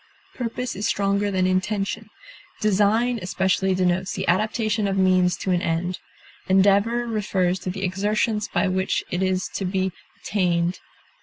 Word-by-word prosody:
Purpose 245 Hz, 0 st, -4 dB
is 205 Hz, +3 st, -1 dB
stronger 200 Hz, 0 st, +1 dB
than 185 Hz, -2 st, +1 dB
intention. 195 Hz, +3 st, -1 dB, 0.5 s
Design 215 Hz, +4 st, +2 dB
especially 190 Hz, +1 st, +1 dB
denotes 185 Hz, 0 st, 0 dB
the 190 Hz, -, -4 dB
adaptation 215 Hz, +3 st, +1 dB
of 195 Hz, 0 st, -1 dB
means 185 Hz, -1 st, +3 dB
to 190 Hz, -, -2 dB
an 175 Hz, -1 st, +2 dB
end; 175 Hz, +2 st, -1 dB, 0.5 s
endeavor 200 Hz, +5 st, +3 dB
refers 190 Hz, -5 st, 0 dB
to 185 Hz, -, -5 dB
the 190 Hz, +1 st, -4 dB
exertions 210 Hz, +3 st, 0 dB
by 200 Hz, -, 0 dB
which 185 Hz, +1 st, 0 dB
it 175 Hz, -, -1 dB
is 185 Hz, 0 st, 0 dB
to -, -, -3 dB
be 190 Hz, 0 st, 0 dB, 0.3 s
attained. 175 Hz, -3 st, 0 dB
190 Hz, 145 wpm, -23 LUFS, 185-210 Hz, 0.5 s, means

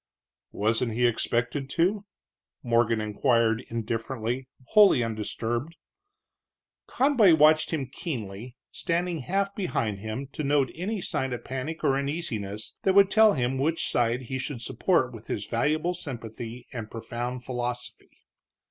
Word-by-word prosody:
"Wasn't 115 Hz, +2 st, 0 dB
he 120 Hz, +2 st, +2 dB
expected 120 Hz, +3 st, 0 dB
to?" 195 Hz, +5 st, +2 dB, 0.6 s
Morgan 115 Hz, -2 st, +2 dB
inquired, 115 Hz, +2 st, +2 dB
indifferently, 115 Hz, +2 st, -3 dB, 0.2 s
wholly 205 Hz, -, +6 dB
undisturbed. 115 Hz, +6 st, -3 dB, 1.1 s
Conboy 245 Hz, -, +5 dB
watched 155 Hz, +1 st, +5 dB
him 155 Hz, -5 st, -1 dB
keenly, 120 Hz, -, -6 dB
standing 170 Hz, 0 st, -1 dB
half 195 Hz, +8 st, -1 dB
behind 115 Hz, -, -1 dB
him, 110 Hz, +6 st, -4 dB
to 155 Hz, -, -3 dB
note 140 Hz, -2 st, +2 dB
any 195 Hz, +4 st, -3 dB
sign 130 Hz, -6 st, -1 dB
of 120 Hz, -, -5 dB
panic 135 Hz, +6 st, -5 dB
or 135 Hz, -3 st, +3 dB
uneasiness 115 Hz, -, -4 dB
that 190 Hz, -1 st, +2 dB
would 200 Hz, -1 st, +6 dB
tell 220 Hz, -1 st, +6 dB
him 130 Hz, 0 st, 0 dB
which 160 Hz, +4 st, 0 dB
side 120 Hz, +1 st, +1 dB
he 130 Hz, +2 st, -4 dB
should 130 Hz, -3 st, -4 dB
support -, -, +1 dB
with -, -, -11 dB
his -, -, -3 dB
valuable 155 Hz, +4 st, 0 dB
sympathy 120 Hz, -6 st, -7 dB
and 115 Hz, -3 st, -5 dB
profound 120 Hz, +2 st, -5 dB
philosophy. 125 Hz, -1 st, -4 dB
130 Hz, 130 wpm, -27 LUFS, 115-160 Hz, 1.1 s, wholly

